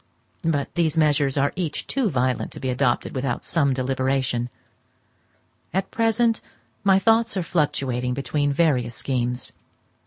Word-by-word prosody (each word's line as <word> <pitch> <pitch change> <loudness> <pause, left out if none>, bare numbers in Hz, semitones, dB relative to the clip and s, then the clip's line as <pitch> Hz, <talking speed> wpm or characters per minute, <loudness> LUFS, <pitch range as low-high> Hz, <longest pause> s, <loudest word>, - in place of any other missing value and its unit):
But 155 -4 0
these 165 -2 +1
measures 145 -3 +3
are 140 +1 +2
each 165 -5 -3
too 260 -6 0
violent 130 -4 0
to - - -7
be 130 - -1
adopted 125 -1 0
without 130 -2 -2
some 145 -5 +2
deliberation; 130 -1 0 1.3
at 190 0 -1
present 225 0 +2 0.4
my 195 -1 +5
thoughts 225 +1 +3
are 185 - 0
fluctuating 130 -7 0
between 145 +1 0
various 135 -7 +1
schemes. 125 -1 -2
140 Hz, 130 wpm, -24 LUFS, 130-170 Hz, 1.3 s, my